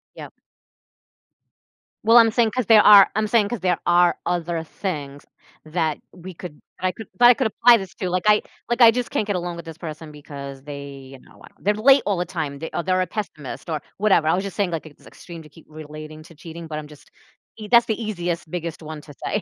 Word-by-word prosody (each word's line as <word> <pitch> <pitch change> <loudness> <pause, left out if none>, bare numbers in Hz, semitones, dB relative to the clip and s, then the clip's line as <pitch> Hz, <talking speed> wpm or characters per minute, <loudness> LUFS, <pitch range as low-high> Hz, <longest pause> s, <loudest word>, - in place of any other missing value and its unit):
Yep. - - -10 1.7
Well, 230 +2 +6
I'm 225 -1 +6
saying 230 -1 +2
'cause 255 -2 -2
there 220 -2 +7
are 205 -2 +8
I'm 215 0 0
saying 210 -2 +2
'cause 240 - -4
there 180 -2 0
are 175 0 +3
other 170 -1 -2
things 145 -5 -6 0.4
that 155 -1 -1
we 185 +1 -11
could 165 -3 -10 0.2
that 185 - 0
I - - 0
could 220 +2 -11
that 240 - +8
I 245 - +8
could 250 0 0
apply 235 +2 +5
this 190 -4 -8
to. 185 - -4
Like, 180 0 -1
I 210 0 +5 0.3
like, 240 +1 0
I 230 - +9
just 245 +1 -3
can't 215 - -1
get 205 -2 -2
along 175 -1 -4
with 170 0 -9
this 165 -1 -10
person 155 -2 -8
because 140 -2 -10
they, 140 -1 -8 0.3
you 135 - -12
know - - -21
what, - - -16
they're 205 - +1
late 265 +6 +4
all 200 -3 0
the 180 - -1
time, 155 -5 -5
they 160 - -6
a 170 - -2
they're 185 0 +1
a 185 - -1
pessimist 170 - -7
or 155 -2 -3 0.2
whatever. 195 -6 +2
I 160 - +3
was 190 - -2
just 200 -2 -7
saying, 200 -4 -1
like, 165 -1 -4
it's 150 - -16
extreme 170 -2 -11
to 150 - -16
keep 160 +2 -18
relating 155 0 -10
to 165 +1 -17
cheating, 165 +2 -10
but 155 -1 -5
I'm 150 -1 -7
just 150 -1 -17 0.5
ea 215 -1 -8
that's 235 -1 +6
the 220 +1 -2
easiest, 175 -6 -4
biggest 170 -2 -5
one 155 -1 -8
to 145 - -14
say. 210 - -1
175 Hz, 240 wpm, -22 LUFS, 155-210 Hz, 1.7 s, I